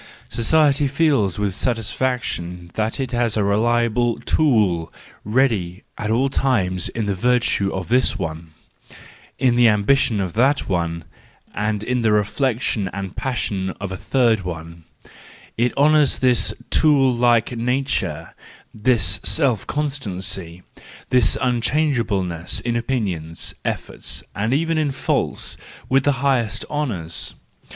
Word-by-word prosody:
Society 145 +3 +3
feels 135 - +1
with 105 -2 -1
satisfaction 110 -7 -2
that 110 +4 -2
it 130 -2 -2
has 120 -3 0
a 105 - +2
reliable 115 +3 +1
tool 105 - +2 0.3
ready 105 -6 0
at 105 - -4
all 120 +5 +2
times 95 -10 +1
in 115 -2 -3
the 100 - 0
virtue 115 -2 +1
of 95 -2 -4
this 125 +2 +2
one, 80 0 -5 0.9
in 125 -3 +2
the 120 -1 +6
ambition 110 +2 +2
of 90 -3 -2
that 135 +5 +2
one, 85 -3 -2 0.5
and 105 0 -2
in 125 +1 -1
the 110 -2 +2
reflection 105 -1 0
and 95 -1 -6
passion 105 -7 -2
of 100 -1 -5
a - - -3
third 115 +1 +1
one,—it 85 +7 -6
honours 150 0 +4
this 125 -2 +2 0.2
tool 140 -5 +4
like 120 -1 +2
nature, 125 +4 -2 0.4
this 105 -4 +2
self 130 -10 +1
constancy, 95 - -3 0.5
this 125 -4 +4
unchangeableness 120 - 0
in 120 -1 -2
opinions, 100 -10 -3
efforts, - - -4
and 110 +3 -1
even 165 +3 +1
in 150 -2 +1
faults, 135 - -2 0.3
with 135 +1 +3
the 145 - +4
highest 120 -7 +1
honours. 100 - -3
115 Hz, 125 wpm, -21 LUFS, 95-130 Hz, 0.9 s, the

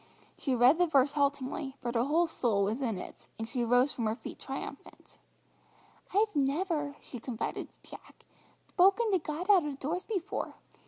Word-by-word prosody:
She 265 -3 -1
read 250 +7 +5
the 355 - +4
verse 280 -2 +3
haltingly, 280 -1 -1
but 240 -1 -3
her 235 -1 +2
whole 325 +5 +3
soul 235 -11 0
was 215 +7 -1
in 230 -7 -1
it, - - -9
and 225 - -4
she 245 +1 -2
rose 245 +4 +3
from 230 -3 -1
her 215 - 0
feet - - -9
triumphant. - - -8 0.9
"I've 420 0 +2
never," 295 +1 0
she 245 - -9
confided 230 -1 -4 0.2
to - - -16
Jack, - - -13 0.5
"thpoken 395 +4 +5
to 375 - +3
God 315 +3 -4
out 375 -4 +6
of 290 -2 -4
doors 330 +7 -3
before. 405 -2 -3
285 Hz, 175 wpm, -31 LUFS, 245-345 Hz, 0.9 s, out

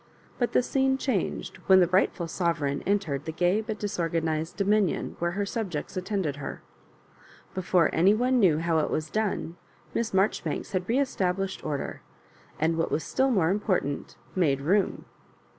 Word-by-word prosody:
But 240 - 0
the - - +4
scene 265 +1 +1
changed 250 - -2
when 190 -1 +8
the 180 - +6
rightful 180 -1 +1
sovereign 160 -5 -1
en 200 +1 +4
tered 145 -8 -4
the 160 - -3
gay 180 +6 +2
but 220 -1 -4
disorganised 165 -5 -2
dominion 200 -2 +1
where 170 0 0
her 205 - 0
subjects 195 -4 -4
attended 185 -6 -2
her. 145 - -6 0.9
Before 180 -2 +2
any 190 +6 +5
one 250 +3 +2
knew 175 -8 +4
how 165 0 +1
it 155 - 0
was 155 0 -2
done. 205 -5 -2 0.4
Miss 230 -1 -1
Marjoribanks 190 -5 0
had 185 0 -2
re 235 - +2
estab 195 -10 +1
lished 195 -1 -4
order, 145 -3 -4 0.6
and, 160 +1 +1
what 165 - +1
was 160 - -1
still 265 +1 +1
more 185 -9 +3
important, 185 -8 -1 0.2
made 150 -7 +2
room. 190 +7 +1
185 Hz, 165 wpm, -27 LUFS, 160-205 Hz, 0.9 s, when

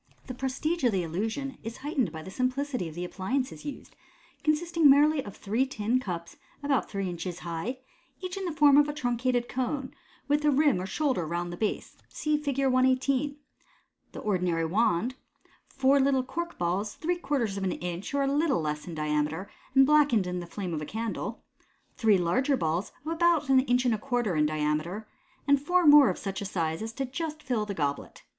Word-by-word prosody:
The 255 - -6
prestige 270 +6 -2
of 245 - +4
the 190 -3 0
illusion 225 - -3
is 225 +1 -7
heightened 280 -6 0
by 160 -1 -7
the 190 - -9
simplicity 255 - -1
of 155 - -12
the 175 +1 -3
appliances 255 +11 -3
used, 290 - -8 0.5
consisting 315 0 +3
merely 290 +1 +5
of 205 - -10
three 220 +6 0
tin 235 0 0
cups 175 -8 -6 0.3
about 280 -3 +1
three 195 -2 -2
inches 175 0 -4
high, 170 +10 -3 0.4
each 365 -1 -5
in 390 -1 -4
the 350 - -1
form 295 -2 +5
of 295 0 +5
a - - -2
truncated 245 -2 0
cone, 260 +1 -3 0.3
with 295 +1 +2
a 300 - +4
rim 285 -8 +3
or 185 - -4
shoulder 255 - 0
round 175 +1 -3
the - - -4
base 215 +3 -3
(see 305 -1 -1
Fig. 285 -3 -2
118), 260 +2 +2 0.8
the - - -7
ordinary 180 -5 0
wand, 215 +5 +1 0.5
four 275 +1 +3
little 265 -1 +3
cork 340 +6 -5
balls, 185 +4 -1
three 350 +2 -1
quarters 245 - -1
of 195 - -3
an 185 - 0
inch 175 +1 -5
or 280 - +2
a - - +1
little 285 - +2
less 150 0 -3
in 170 - -6
diameter, 150 +4 -1 0.2
and 270 0 +7
blackened 285 -8 +4
in 180 0 -3
the 175 - -7
flame 185 -1 -5
of 155 - -2
a - - -4
candle, 225 +1 -4 0.5
three 215 -4 +4
larger 255 +11 +1
balls 165 +1 -1
of 320 - -2
about 330 -3 +2
an 265 -1 +6
inch 250 -1 +2
and 245 - +3
a 215 - -2
quarter 240 -6 -1
in 150 -1 +3
diameter, 155 +7 -2 0.4
and 280 -1 +4
four 355 +4 +2
more 290 -4 +8
of 185 - -2
such 195 0 -4
a - - -3
size 165 -4 -2
as 225 0 -4
to 270 +4 -3
just 305 +3 -5
fill 230 -5 -1
the 200 - -4
goblet. 145 -3 -3
245 Hz, 200 wpm, -28 LUFS, 180-280 Hz, 0.8 s, more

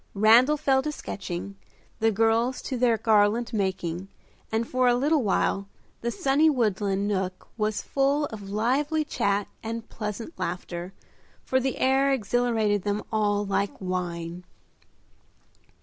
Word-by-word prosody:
Randal 235 +8 +6
fell 270 -3 +2
to 300 - -3
sketching, 195 -7 -6 0.4
the 225 0 +3
girls 225 +4 +1
to 265 - -3
their 240 -2 +3
garland 220 +2 +2
making, 190 -3 -2 0.4
and 225 +1 0
for 255 0 +2
a 245 - +5
little 290 +4 +2
while 200 -2 0 0.3
the 235 - -1
sunny 275 +6 +3
woodland 205 -6 0
nook 190 -2 -3
was 215 -1 -1
full 280 +2 +1
of 205 -2 -8
lively 275 +9 +1
chat 200 -7 0
and 230 0 -5
pleasant 215 - -6
laughter, 175 +1 -4 0.5
for 260 - +1
the 260 0 -2
air 270 +1 +3
exhilarated 225 -3 +1
them 205 +2 -2
all 205 -1 +1
like 200 0 -1
wine. 175 -2 -4
220 Hz, 135 wpm, -26 LUFS, 200-255 Hz, 0.5 s, Randal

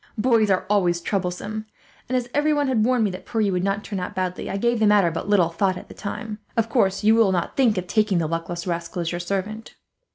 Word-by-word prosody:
Boys 220 -2 +3
are 190 -1 +2
always 180 -4 +2
troublesome 200 +4 -3 0.4
and, 255 - +1
as 245 -1 -2
everyone 290 -1 +2
had 245 -5 +2
warned 250 0 +2
me 205 - +1
that 185 - -8
Pierre 215 -3 0
would 195 +3 -1
turn 200 -3 -4
out 180 +3 -5
badly, 185 -1 -3
I 195 - -2
gave 235 +2 +1
the 220 - +4
matter 205 -5 +4
but 165 +5 -5
little 185 -5 +4
thought 185 +2 0
at - - -11
the - - -9
time. 210 +1 -6 0.2
Of 230 0 +1
course, 205 -5 +1
you 215 +1 +5
will 225 -4 +4
not 175 -2 -1
think 240 -7 +3
of 185 - -2
taking 210 0 +1
the 165 - +1
luckless 165 +2 -3
rascal 170 0 -3
as 165 - -2
your 175 - -3
servant." 200 +5 -4
200 Hz, 235 wpm, -23 LUFS, 180-220 Hz, 0.4 s, you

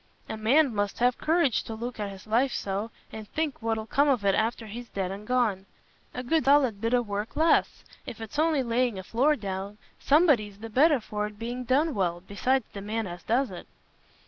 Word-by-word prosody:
A - - -4
man 250 +5 +3
must 205 -1 -1
have 245 0 +2
courage 320 -6 +2
to 225 - -6
look 235 +1 -6
at 205 -1 -2
his 195 -1 -11
life 240 +5 +2
so, 200 +3 -3 0.2
and 220 -1 -8
think 310 -5 -2
what'll 225 -1 -1
come 285 +6 +2
of 245 -7 +1
it 195 - +4
after 225 +2 0
he's 235 +3 -8
dead 190 -2 -3
and 205 +2 -8
gone. 220 -7 +1 0.5
A 250 - -4
good 310 +2 +1
solid 270 -7 +4
bit 230 +2 +2
o' 245 - +2
work 205 0 -4
lasts: 320 +2 +2 0.2
if 225 - -7
it's 225 +6 -6
only 310 -4 +2
laying 240 -2 0
a 190 - -6
floor 265 +10 +2
down, 200 -2 -5 0.2
somebody's 275 - +3
the 225 +2 -9
better 290 +4 +4
for 210 -1 -3
it 210 0 -12
being 240 +3 -5
done 285 +6 +2
well, 175 -3 -1
besides 250 +5 0
the 200 - -6
man 220 +2 -3
as 175 -1 -7
does 250 +4 0
it." - - -9
225 Hz, 210 wpm, -27 LUFS, 205-260 Hz, 0.5 s, it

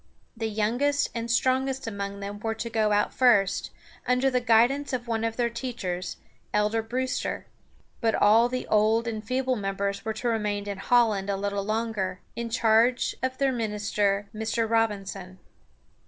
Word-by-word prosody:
The 225 -1 -2
youngest 245 +7 +1
and 230 0 -4
strongest 260 +2 +1
among 200 -2 -5
them 200 +1 -6
were 225 +1 -2
to 230 +1 -5
go 215 -1 +1
out 205 0 +2
first, 215 -7 +3 0.4
under 250 +2 +2
the 250 -1 +1
guidance 250 +5 +3
of 245 -1 -3
one 225 -1 -1
of 225 0 -2
their 240 -1 +2
teachers, 210 -7 -4 0.4
Elder 210 +2 +2
Brewster. 255 +3 -3 0.5
But 225 -2 +1
all 225 +4 +5
the 255 0 -3
old 220 +2 +2
and 220 -2 -3
feeble 255 +3 0
members 200 -1 -2
were 220 - -2
to 240 - -3
remain 210 -3 -1
in 200 -2 -4
Holland 210 -3 +2
a 200 - 0
little 200 0 -2
longer, 215 -3 -2 0.2
in 235 0 -4
charge 230 +1 +3
of 260 0 -2
their 275 -1 +2
minister, 210 -3 -1
Mr. 220 +1 -1
Rob´in 220 -3 +1
son. 185 -1 -8
225 Hz, 165 wpm, -26 LUFS, 205-240 Hz, 0.5 s, all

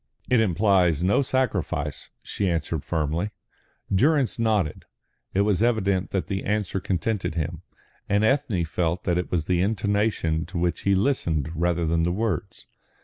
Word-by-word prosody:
"It 125 - +5
implies 90 -5 +3
no 100 +8 +3
sacrifice," 95 - -1
she 100 -2 -1
answered 80 -2 -2
firmly. 80 +4 -1 0.6
Durrance 135 +4 +2
nodded. 105 -9 0 0.5
It 100 - +4
was 100 -1 +2
evident 100 -5 +1
that 95 - -1
the 95 -1 -3
answer 105 -2 -1
contented 95 0 -2
him, 80 0 -3 0.5
and 100 +2 +2
Ethne 110 - +1
felt 85 +2 -1
that 90 0 +1
it 90 - -3
was 85 -4 -1
the 90 0 +1
intonation 100 -5 0
to - - -6
which 85 0 0
he 100 - +5
listened 85 - 0
rather 85 0 0
than 85 +1 +1
the 85 +1 +1
words. 100 -4 -3
95 Hz, 150 wpm, -25 LUFS, 85-105 Hz, 0.6 s, It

